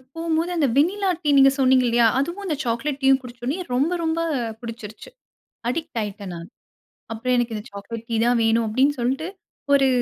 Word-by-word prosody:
போம்போது, 330 +1 -1
அந்த 300 -4 +3
vanilla 380 +6 +2
tea 295 - +1
நீங்க 270 0 +7
சொன்னீங்க 260 -1 +4
இல்லையா, 235 0 +4
அதுவும் 345 +8 -3
அந்த 325 -5 -1
சாக்லேட் 265 +4 -2
டீயும் 270 0 +5
குடிச்சோன்னே, 250 +7 -5
ரொம்ப 275 +7 +2
ரொம்ப 320 0 0 0.4
பிடிச்சிருச்சு. 230 - -9 0.6
அடிக்ட் 305 -2 -3
ஆயிட்டேன் 200 -3 -6
நானு. 170 0 -8 0.7
அப்புறம் 250 +3 -1
"எனக்கு 240 -2 0
இந்த 210 - -7
சாக்லேட் 225 +3 -8
டீ 230 - 0
தான் 245 0 +3
வேணும்" 225 0 +2
அப்படின்னு 270 +6 +2
சொல்ட்டு, 265 +6 -1 0.5
ஒரு 275 -1 +4
255 Hz, 170 wpm, -23 LUFS, 230-300 Hz, 0.7 s, நீங்க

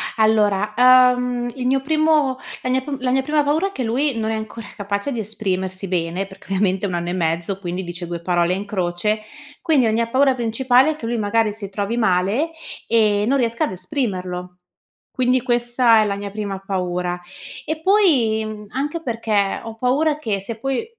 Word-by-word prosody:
Allora, 210 -2 +2
uhm, 250 -1 +4
il 250 -1 -4
mio 270 0 +2
primo 305 -3 +2 0.2
la 255 - -3
mia 260 +1 +2
p 280 +1 -4
la 255 -1 0
mia 265 +1 +3
prima 300 +1 +1
paura 310 +7 +1
è - - -7
che 260 - -4
lui 250 +3 0
non 220 0 -1
è - - -1
ancora 220 0 -6
capace 200 +5 -3
di 235 - -3
esprimersi 190 -3 -3
bene, 175 +1 -1
perché 190 - -15
ovviamente 195 0 0
ha - - 0
1 175 - -2
anno 175 0 -2
e - - -2
mezzo, 170 +2 -1
quindi 180 0 -4
dice 175 0 -6
2 170 -1 -5
parole 175 0 +1
in 200 +2 -3
croce, 200 +2 -1 0.4
quindi 290 -7 +3
la 220 - +2
mia 230 +1 +1
paura 270 +1 +4
principale 250 +4 +3
è - - -4
che 235 - -8
lui, 235 0 -1
magari, 215 +1 +1
si 205 -2 -8
trovi 205 +4 -2
male 220 - +1 0.4
e 210 -2 +3
non 275 +2 +3
riesca 235 -2 +1
ad - - -5
esprimerlo. 180 -3 -4 0.5
Quindi 255 -1 +2
questa 240 -1 +3
è - - -1
la 200 -1 -1
mia 200 0 -5
prima 200 -2 -4
paura, 180 -2 -2 0.5
e 315 0 -3
poi 295 - +3
mhmm, 210 -1 -7
anche 295 +6 -3
perché 220 -6 0
ho 225 -1 -7
paura 290 +6 +1
che 210 -8 -2
se 220 +2 -7
poi, 270 - -2
220 Hz, 195 wpm, -21 LUFS, 195-255 Hz, 0.5 s, uhm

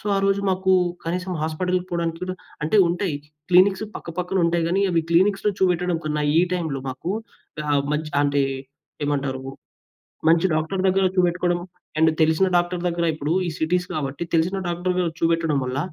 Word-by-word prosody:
So, 210 - -10
ఆరోజు 195 0 +2
మాకు 190 0 0 0.3
కనీసం 180 +2 -2
హాస్పిటల్‌కి 180 +3 -1
పోవడానికి 170 -1 -2
కూడా 185 0 -3 0.3
అంటే 160 - +2
ఉంటాయి. 175 -2 -1 0.3
క్లినిక్స్ 190 +3 +5
పక్కపక్కన 180 +3 -3
ఉంటాయి 170 0 +1
గానీ, 190 +3 +1
అవి 170 -2 +2
క్లీనిక్స్‌లో 195 +4 +3
చూబెట్టడం 180 -2 +1
కన్నా, 150 -1 -1 0.2
ఈ - - +7
టైంలో 160 -6 -2
మాకు 130 +7 -4 0.5
గా 150 - -5 0.3
మంచి 150 0 -3
ఆహ్, 145 - +4
అంటే 140 -1 +2 0.6
ఏమంటారు, 135 -2 -1 0.9
మంచి 170 +2 +4
డాక్టర్ 160 +5 -1
దగ్గర 190 +1 +3
చూబెట్టుకోడం, 175 0 +2 0.4
అండ్ 160 +1 +5
తెలిసిన 160 +4 +3
డాక్టర్ 175 0 -1
దగ్గర 170 0 0
ఇప్పుడు 155 0 -3 0.2
ఈ - - -1
సిటీస్ 180 +3 +1
కాబట్టి 140 +1 -3
తెలిసిన 170 +4 +1
డాక్టర్ 175 +1 -1
దగ్గర 175 -2 +1
చూబెట్టడం 165 -2 +2
వల్ల, 130 +2 -2
170 Hz, 160 wpm, -23 LUFS, 160-185 Hz, 0.9 s, ఈ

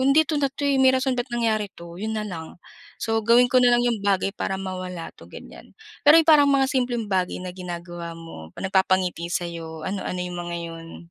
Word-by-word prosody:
nun, 275 +2 +3
"Hindi 315 - +6
ito 310 - -3
na 275 - +2
'to 280 +2 -6
eh, 275 -1 +2
may 265 - +6
rason 260 0 0
ba't 245 +1 -2
nangyari 225 -4 0
'to." 170 0 -12
Yun 220 +1 -3
nalang. 180 -7 -6 0.4
So, 225 0 -1
gawin 240 +3 +4
ko 255 - +6
nalang 245 -1 +4
yung 235 -3 0
bagay 195 -1 +1
para 195 -2 -3
mawala 185 -2 -6
'to, - - -16
ganiyan. - - -13 0.2
Pero 295 +2 +7
yung 330 - +6
parang 290 -2 +7
mga 275 -1 +4
simpleng 245 -3 0
bagay 190 -3 -1
na 180 - -5
ginagawa 175 -2 -7
mo, 165 - -10
nagpapangiti 185 -2 +1
sa 175 - -1
'yo, 165 -2 -7
ano-ano 190 -1 -3
yung 180 0 -6
mga 175 0 -4
yun? 165 -1 -8
195 Hz, 210 wpm, -24 LUFS, 175-245 Hz, 0.4 s, Pero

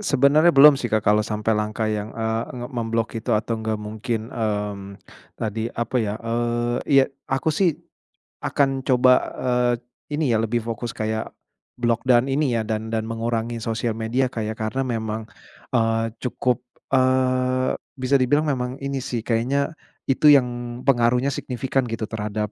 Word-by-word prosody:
Sebenarnya 150 -1 +4
belum 140 0 +8
sih 120 - -2
Kak, 110 -1 +1
kalau 105 +1 +4
sampai 110 +1 0
langkah 105 +1 -2
yang, 105 0 -3
eee, 110 0 -1
nge 120 0 -5
mem-block 115 -1 -1
itu 120 - -5
atau 110 +1 -1
nggak 110 0 -1
mungkin, 110 +2 -4
mmm, 105 -3 -3 0.4
tadi 110 +1 -2
apa 120 +2 -2
ya, 105 -2 -1
eee, 120 +1 -1
iya 135 -2 +5 0.2
aku 135 +4 0
sih 170 -1 +2 0.7
akan 135 -2 +1
coba, 130 -1 +4 0.3
eee, 125 -1 +2 0.4
ini 155 +2 0
ya - - +3
lebih 120 +2 0
fokus 115 0 -3
kayak 110 0 -3 0.5
block 120 -1 +1
dan 125 0 +4
ini 135 0 +1
ya - - 0
dan 110 0 -3
dan 110 0 -1
mengurangi 115 0 -2
sosial 115 0 -1
media 115 +4 0
Kak 115 -3 -4
ya, 110 - -2
karena 120 +5 -1
memang, 110 -3 -3 0.5
eee, 115 -1 +1
cukup, 125 0 -1 0.3
eee, 130 0 +2 0.2
bisa 130 +1 +1
dibilang 145 +4 +3
memang 130 -4 -1
ini 140 -1 -2
sih 120 -3 -4
kayaknya 130 +6 0 0.3
itu 135 +3 +2
yang 120 -3 +3
pengaruhnya 125 +1 +3
signifikan 130 0 -2
gitu 115 -1 -4
terhadap 105 -1 -3
120 Hz, 155 wpm, -23 LUFS, 110-130 Hz, 0.7 s, belum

